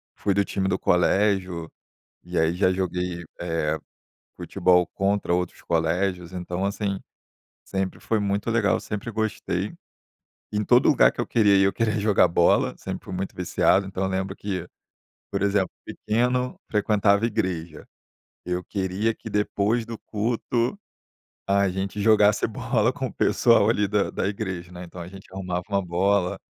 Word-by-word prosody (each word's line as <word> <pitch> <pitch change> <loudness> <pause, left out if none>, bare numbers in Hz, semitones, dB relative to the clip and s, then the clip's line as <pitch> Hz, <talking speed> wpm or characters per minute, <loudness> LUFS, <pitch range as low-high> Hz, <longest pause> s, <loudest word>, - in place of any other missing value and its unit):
fui 100 - 0
do 100 +1 +2
time 95 -1 -1
do 95 - 0
colégio, 90 -2 +1 0.5
e 90 0 -5
aí 80 +1 +2
já 95 0 +3
joguei, 90 -1 -2 0.2
eh, 80 -2 -1 0.6
futebol 90 -1 +2
contra 100 -2 0
outros 90 -1 -3
colégios, 85 +2 -1
então 90 +1 -3
assim, 100 -1 -2 0.6
sempre 95 -1 -3
foi 110 - 0
muito 100 +1 -1
legal, 115 -3 +2
sempre 105 +3 -5
gostei. 110 -1 -2 0.8
Em 105 0 0
todo 120 +4 +4
lugar 145 - +5
que - - -17
eu 120 - +1
queria 105 -4 +4
ir 95 - +5
eu 95 - +2
queria 110 -2 0
jogar 100 -3 +4
bola, 85 0 +3
sempre - - -6
fui - - -7
muito 95 +1 -4
viciado. 95 +2 +2
Então 95 0 -3
eu 95 - 0
lembro 95 +1 -2
que, 95 -4 -4 0.6
por 100 - -2
exemplo, 100 -2 +1
pequeno 125 +3 -1
frequentava 105 0 +3
igreja, 90 -8 -2 0.6
eu 90 0 -2
queria 100 +3 -1
que 110 - -9
depois 105 +2 0
do 115 -1 -7
culto 115 +2 -1 0.7
a 100 0 +3
gente 95 +2 -3
jogasse 105 -1 +4
bola 110 - 0
com - - -3
o - - -11
pessoal 115 -3 +4
ali 105 -3 +2
da 100 0 +1
da - - -2
igreja, 95 -4 -4
né, 90 0 -8
então 90 +1 -10
a 85 - -6
gente 95 +1 -12
arrumava 90 -2 -3
uma 100 -1 0
bola 90 +1 +1
100 Hz, 160 wpm, -25 LUFS, 90-105 Hz, 0.8 s, lugar